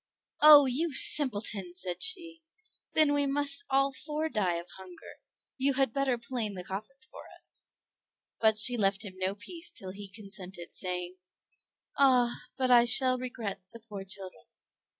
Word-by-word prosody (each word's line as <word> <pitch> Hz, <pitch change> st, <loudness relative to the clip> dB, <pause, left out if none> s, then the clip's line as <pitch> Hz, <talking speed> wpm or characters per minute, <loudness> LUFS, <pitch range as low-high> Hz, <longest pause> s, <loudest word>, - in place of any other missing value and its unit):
"Oh, 295 Hz, -2 st, +9 dB
you 275 Hz, +4 st, -2 dB
simpleton!" 210 Hz, -12 st, +3 dB
said 180 Hz, -1 st, -2 dB
she, 335 Hz, -7 st, +1 dB, 0.5 s
"then 305 Hz, -2 st, +4 dB
we 285 Hz, -1 st, +1 dB
must 280 Hz, +5 st, +1 dB
all 275 Hz, 0 st, +1 dB
four 305 Hz, +3 st, -4 dB
die 190 Hz, -, -1 dB
of 170 Hz, +1 st, -6 dB
hunger; 185 Hz, -2 st, -13 dB, 0.4 s
you 275 Hz, +1 st, +1 dB
had 265 Hz, -3 st, 0 dB
better 275 Hz, -3 st, 0 dB
plane 235 Hz, -4 st, -5 dB
the 180 Hz, -, -7 dB
coffins 215 Hz, +9 st, -6 dB
for -, -, -13 dB
us." -, -, -7 dB, 0.8 s
But 220 Hz, -1 st, +2 dB
she 240 Hz, +3 st, +4 dB
left 200 Hz, 0 st, 0 dB
him 195 Hz, -, -8 dB
no 190 Hz, +1 st, -2 dB
peace 330 Hz, -, -7 dB
till 190 Hz, -1 st, -8 dB
he 200 Hz, +1 st, -9 dB
consented 190 Hz, -3 st, -7 dB
saying, 180 Hz, -1 st, -3 dB, 0.8 s
"Ah, 250 Hz, -3 st, +3 dB, 0.2 s
but 255 Hz, -1 st, 0 dB
I 240 Hz, -1 st, +6 dB
shall 255 Hz, +1 st, +5 dB
regret 230 Hz, -6 st, -6 dB
the 230 Hz, -, -11 dB
poor 210 Hz, -3 st, -9 dB
children." 190 Hz, -, -8 dB
235 Hz, 155 wpm, -29 LUFS, 195-275 Hz, 0.8 s, Oh